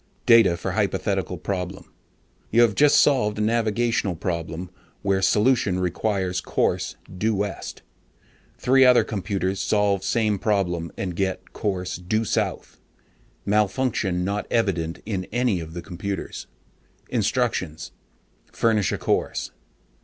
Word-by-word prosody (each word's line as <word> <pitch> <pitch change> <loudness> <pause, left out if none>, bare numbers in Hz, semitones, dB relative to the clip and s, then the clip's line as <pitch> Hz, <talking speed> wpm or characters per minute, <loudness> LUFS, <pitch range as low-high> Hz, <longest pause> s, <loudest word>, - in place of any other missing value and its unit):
DATA 115 -8 +6
FOR - - -3
HYPOTHETICAL - - -1
PROBLEM: 95 -1 -5 0.6
YOU 115 - +4
HAVE 115 -3 +3
JUST 145 +6 +5
SOLVED 105 -8 +3
A - - -1
NAVIGATIONAL 115 -2 +1
PROBLEM 85 +1 -4 0.3
WHOSE 95 -1 +2
SOLUTION 105 -4 +2
REQUIRES 90 0 -1
COURSE - - -1 0.2
DUE 110 +1 +1
WEST. 100 -2 -4 0.7
THREE 130 +1 +4
OTHER 125 -1 +6
COMPUTERS 95 -2 -2
SOLVE 100 -2 +1
SAME 110 -4 +1
PROBLEM 90 -6 0
AND 90 -3 -3
GET 95 0 -3
COURSE 95 -3 -2
DUE 110 +6 -1
SOUTH. - - -2 0.7
MALFUNCTION 105 -3 +1
NOT 100 +2 -2
EVIDENT 90 -8 -1
IN 95 -4 -3
ANY 120 -5 +1
OF 80 -1 -8
FOUR 85 - -5
COMPUTERS. 100 +2 -5 0.6
INSTRUCTIONS: 110 -8 -1 0.6
FURNISH 110 -4 +1
A - - -1
COURSE. - - -1
100 Hz, 120 wpm, -24 LUFS, 90-110 Hz, 0.7 s, DATA